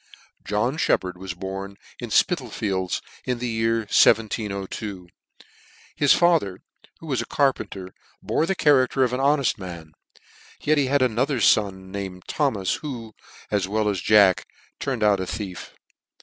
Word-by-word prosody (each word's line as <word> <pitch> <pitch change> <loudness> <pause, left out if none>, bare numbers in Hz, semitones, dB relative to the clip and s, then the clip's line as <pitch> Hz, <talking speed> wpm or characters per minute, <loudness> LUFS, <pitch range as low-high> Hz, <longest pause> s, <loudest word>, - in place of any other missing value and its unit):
John 110 +8 -1
Sheppard 90 - +1
was 90 0 -7
born 95 +2 -6 0.2
in - - -6
Spital - - +2
fields 95 -3 -2 0.2
in 125 -1 -2
the 125 +1 -3
year 115 0 0
1702. 100 -3 +1 0.9
His 145 - +3
father, 165 - +2 0.4
who - - -12
was 135 -5 -1
a - - -7
carpenter, 100 -9 -1 0.3
bore 160 - 0
the 195 - 0
character 135 -4 +3
of 125 -1 0
an 125 - -1
honefi 140 -4 +2
man; 85 -4 -8 0.7
yet 150 0 +2
he 140 - +1
had 140 0 +2
another 125 +3 0
fon 95 -4 +2
named 95 -2 -6
Thomas, 110 -11 0
who, 120 -7 -7 0.4
as 100 -3 +1
well 105 +1 0
as 100 -4 -1
jack 100 -2 +4 0.3
turned 130 -5 -2
out 105 -2 +4
a 95 - -3
thief. 95 -2 -6
105 Hz, 150 wpm, -24 LUFS, 95-130 Hz, 0.9 s, jack